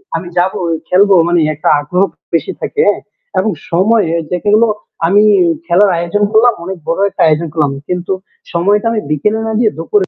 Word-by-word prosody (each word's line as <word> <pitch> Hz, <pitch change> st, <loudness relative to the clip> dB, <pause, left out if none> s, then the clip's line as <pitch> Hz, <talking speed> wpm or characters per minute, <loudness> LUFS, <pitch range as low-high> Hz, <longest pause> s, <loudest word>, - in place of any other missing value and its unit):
আমি 170 Hz, +2 st, -4 dB
যাবোই, 175 Hz, -2 st, 0 dB, 0.2 s
খেলবো 195 Hz, +1 st, +4 dB
মানে 175 Hz, 0 st, +2 dB
একটা 150 Hz, -, -1 dB
আগ্রহ 180 Hz, +6 st, 0 dB, 0.3 s
বেশি 165 Hz, -, 0 dB
থাকে, 440 Hz, -, -1 dB
হ্যাঁ? -, -, +1 dB, 0.4 s
এবং 220 Hz, -, 0 dB, 0.2 s
সময় 205 Hz, +5 st, +2 dB
এই 165 Hz, -, -3 dB
যেগুলো 210 Hz, +6 st, +2 dB, 0.4 s
আমি 205 Hz, +3 st, +4 dB, 0.4 s
খেলার 190 Hz, +3 st, +3 dB
আয়োজন 175 Hz, +5 st, -1 dB
করলাম। 230 Hz, +2 st, +4 dB
অনেক 190 Hz, 0 st, -5 dB
বড় 170 Hz, +3 st, -1 dB
একটা -, -, -5 dB
আয়োজন 160 Hz, +2 st, +1 dB
করলাম। 150 Hz, -4 st, +1 dB, 0.2 s
কিন্তু 180 Hz, +1 st, -2 dB, 0.4 s
সময়টা 205 Hz, +6 st, +1 dB
আমি 220 Hz, -, 0 dB
বিকেলে 210 Hz, +9 st, 0 dB
না -, -, -2 dB
দিয়ে 220 Hz, -3 st, +2 dB
দুপুরে 190 Hz, +4 st, 0 dB
185 Hz, 175 wpm, -14 LUFS, 170-210 Hz, 0.4 s, খেলবো